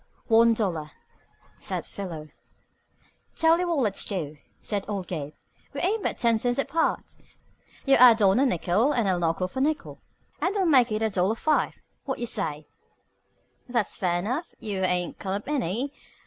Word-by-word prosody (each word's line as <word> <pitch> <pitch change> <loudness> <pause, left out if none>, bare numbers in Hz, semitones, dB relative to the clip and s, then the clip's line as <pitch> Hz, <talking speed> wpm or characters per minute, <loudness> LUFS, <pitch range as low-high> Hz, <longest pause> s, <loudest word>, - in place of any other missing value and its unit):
"One 230 0 +5
dollar," 170 -9 -2 0.7
said - - -4
Philo. 165 -6 -7 1.1
"Tell 325 +1 +4
you 360 - 0
what 335 -2 0
let's 210 -5 +1
do," 155 -7 -4 0.2
said 205 -2 -2
old 200 -3 -3
Gabe. 150 -4 -5 0.4
"We - - -4
ain't 410 +5 +1
but - - -2
ten 230 -2 +3
cents 245 +1 0
apart. 320 +4 -1 0.7
You 275 -1 +5
add 240 -2 +8
on 195 +2 +4
a 275 - +4
nickel 215 - +1
and 235 -4 +1
I'll 185 -2 +1
knock 165 +1 0
off 185 +7 -4
a - - +1
nickel, 305 +2 -2 0.4
and 380 +3 0
we'll 390 -2 +1
make 255 -8 +5
it 215 +1 -1
a 220 - +1
dollar 190 +3 +1
five. 305 +6 +1 0.3
What 265 -2 -3
say? 155 -9 -1 1.0
That's 235 -4 0
fair 175 -2 0
enough. 250 - -3
You 200 -3 -3
ain't 180 -1 0
come 190 -1 -3
up 205 - -6
any. 270 - -1
220 Hz, 170 wpm, -26 LUFS, 185-270 Hz, 1.1 s, add